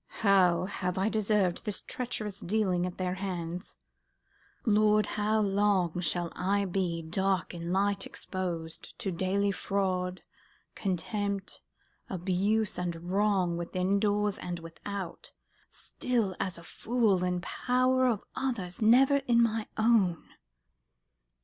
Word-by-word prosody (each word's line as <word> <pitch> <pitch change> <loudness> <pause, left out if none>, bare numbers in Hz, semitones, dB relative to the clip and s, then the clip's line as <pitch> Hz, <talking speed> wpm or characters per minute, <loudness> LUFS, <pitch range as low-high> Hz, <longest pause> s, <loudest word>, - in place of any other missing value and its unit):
"How 185 -4 +4
have 185 -1 -3
I 195 +3 +2
deserved 210 -4 +1
this 210 -2 -3
treacherous 215 -5 -4
dealing 185 -2 0
at 180 - -7
their 180 -1 -1
hands? 180 -2 -5 0.9
Lord, 215 -1 +4
how 215 +1 +1
long 195 -4 +2
shall 175 -1 0
I 200 +2 +1
be 175 -3 -1
dark 190 +3 0
in 170 0 -5
light 195 +1 +1
exposed 170 -4 -4
To 195 - -3
daily 190 +3 +1
fraud, 185 -2 -1 0.5
contempt, 200 +1 -3 0.5
abuse, 195 +4 0
and 175 0 -4
wrong, 195 -4 +2
Within 185 +3 0
doors 205 -1 +1
and 175 -1 -4
without, 170 +2 -7 0.4
still 230 -7 -2
as 185 -3 -2
a 170 - -11
fool 215 -1 +1
In 180 0 0
power 255 +6 +1
of 225 -5 0
others, 215 -10 -3
never 260 +6 +6
in 235 -1 +5
my 225 -1 0
own? 215 -7 +2
195 Hz, 120 wpm, -30 LUFS, 180-210 Hz, 0.9 s, never